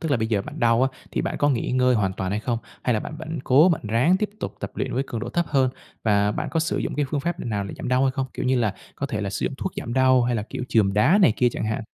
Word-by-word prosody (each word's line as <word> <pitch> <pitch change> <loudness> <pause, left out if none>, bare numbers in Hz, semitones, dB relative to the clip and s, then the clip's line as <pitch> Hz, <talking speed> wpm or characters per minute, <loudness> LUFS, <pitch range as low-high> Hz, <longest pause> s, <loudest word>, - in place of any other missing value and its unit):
Tức 160 -3 -3
là 140 - +4
bây 110 0 -1
giờ 105 -3 0
bạn - - -8
đau 115 +1 +4
á 135 - +4 0.2
thì - - -1
bạn - - -2
có 145 - +3
nghỉ 125 -4 -1
ngơi 125 0 +3
hoàn 95 -4 +1
toàn 95 0 -3
hay 105 +1 -1
không? 115 0 -1 0.2
Hay 125 - +1
là 110 - 0
bạn 155 - -7
vẫn 160 0 -5
cố 145 +8 +6
bạn - - -3
ráng 125 +12 +3
tiếp 210 +1 -2
tục - - -4
tập - - -4
luyện 130 - -3
với 130 - +1
cường 115 - -4
độ 120 - -4
thấp 170 +5 0
hơn 135 -3 +2 0.3
và 105 -1 +3
bạn - - -3
có 165 - +1
sử 165 - -1
dụng - - -2
cái 145 - +1
phương 145 - 0
pháp 175 +4 -3
nào 105 -4 -2
để - - -7
giảm 125 - -5
đau 125 +1 +3
hay 135 - +3
không? 135 -1 -2
Kiểu - - -3
như 130 -1 +3
là, 110 -5 0 0.2
có 140 - -3
thể 110 -7 -3
là 100 -1 -2
sử - - -3
dụng 135 - -3
thuốc 190 - -3
giảm 120 - -4
đau 130 -1 +4
hay 120 0 0
là, 105 - -1
kiểu, 115 - -6
chườm 100 -4 +3
đá 145 - +4
này 180 - +5
kia 125 - +4
chẳng - - -3
hạn? 110 +1 -2
125 Hz, 330 wpm, -24 LUFS, 110-140 Hz, 0.3 s, cố